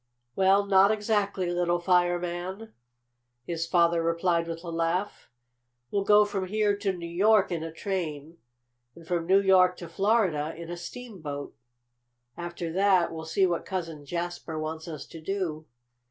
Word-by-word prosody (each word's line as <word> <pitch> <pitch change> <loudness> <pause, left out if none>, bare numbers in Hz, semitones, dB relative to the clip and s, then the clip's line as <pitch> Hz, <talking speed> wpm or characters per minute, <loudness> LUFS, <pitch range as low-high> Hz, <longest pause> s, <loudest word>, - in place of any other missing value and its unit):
"Well, 195 +1 +4
not 195 0 +5
exactly, 205 -4 0
little 175 0 +1
fireman," 175 +3 0 0.7
his 165 -1 -3
father 170 -1 +3
replied 170 0 +1
with 165 0 -6
a 170 - -5
laugh. 165 +4 -2 0.6
"We'll 200 -1 0
go 210 0 +6
from 195 -2 -3
here 210 +1 +1
to 200 -1 0
New 175 -2 -7
York 195 +4 +3
in 170 -2 -2
a 165 0 -5
train, 165 -3 -4 0.6
and 170 - -14
from 170 -1 -2
New 190 +2 +6
York 185 -2 +4
to 170 - -8
Florida 180 -5 +1
in 170 +1 -8
a - - -3
steamboat. 175 - -7 0.8
"After 175 -1 -5
that 190 -2 +3
we'll 160 0 -6
see 160 +4 +2
what 175 -2 -1
Cousin 165 -5 -5
Jasper 170 +1 -4
wants 160 +1 -5
us 160 -2 -7
to 165 - -11
do. 160 -3 -3
175 Hz, 155 wpm, -27 LUFS, 165-195 Hz, 0.8 s, go